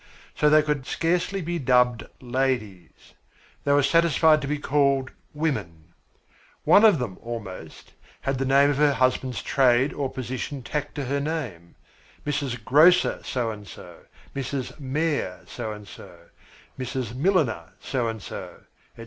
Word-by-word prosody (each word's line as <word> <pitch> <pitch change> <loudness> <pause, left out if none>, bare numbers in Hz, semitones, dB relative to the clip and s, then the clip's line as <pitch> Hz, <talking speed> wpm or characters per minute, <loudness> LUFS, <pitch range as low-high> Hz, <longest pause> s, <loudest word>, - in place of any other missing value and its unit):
So 150 - +3
they 155 0 +6
could 150 -3 -2
scarcely 180 +3 0
be 170 +1 -2
dubbed 125 -2 +2
"ladies." 120 -8 -3 0.5
They - - +1
were 145 0 +4
satisfied 160 0 +4
to 140 - -4
be 150 +1 -1
called 140 -2 +1 0.2
"women." 100 - -3
Each 85 - -38 0.4
one 205 - +6
of 215 -6 +7
them, 120 -8 -5
almost, 115 -5 -8 0.3
had 135 -1 -2
the 135 - 0
name 140 +2 +4
of 140 - -2
her 145 -1 +4
husband's 130 0 0
trade 130 +1 +3
or 135 -2 -3
position 130 +1 -5
tacked 145 +2 -4
to 145 - -3
her 140 +3 -1
name 130 - -5 0.5
Mrs. 140 -6 -3
Grocer 165 +8 +5
so 120 -3 -2
and 105 -2 -10
so, - - -12 0.4
Mrs. 135 +1 -4
Mayor 140 - -2
so 110 - -6
and 105 -1 -9
so, 90 -3 -12 0.6
Mrs. 130 -3 -4
Milliner 135 - 0
so 125 -4 -2
and 110 -3 -5
so, - - -8 0.4
etc. - - -17
135 Hz, 150 wpm, -25 LUFS, 120-150 Hz, 0.6 s, of